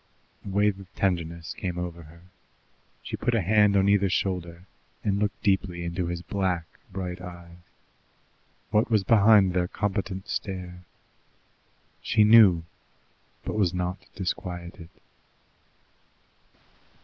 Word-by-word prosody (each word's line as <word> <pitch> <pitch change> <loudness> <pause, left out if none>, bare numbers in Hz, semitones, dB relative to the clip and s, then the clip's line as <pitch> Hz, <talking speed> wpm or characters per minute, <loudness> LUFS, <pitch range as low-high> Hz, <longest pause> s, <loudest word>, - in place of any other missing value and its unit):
A - - -7
wave 100 0 +1
of 95 -2 -13
tenderness 85 -2 -2
came 90 -2 -4
over 90 -1 -5
her. 85 +2 -16 0.8
She - - -5
put 120 - 0
a 110 - +2
hand 105 +2 +4
on 95 0 +3
either 100 -1 +3
shoulder, 90 -2 -2 0.4
and 100 -1 0
looked 105 -1 -2
deeply 95 -3 0
into 85 +1 -2
the 85 0 -4
black, 95 -4 -1 0.3
bright 90 -1 -5
eyes. 85 -1 -11 1.1
What 105 +1 +2
was 110 -4 +3
behind 105 -3 +5
their 90 -1 +1
competent 95 0 -3
stare? 90 -2 -5 1.2
She 110 -1 +3
knew, 105 -6 +7 0.8
but - - -3
was 95 -4 +1
not 90 +1 -2 0.2
disquieted. 90 -2 -5
95 Hz, 120 wpm, -26 LUFS, 90-100 Hz, 1.2 s, knew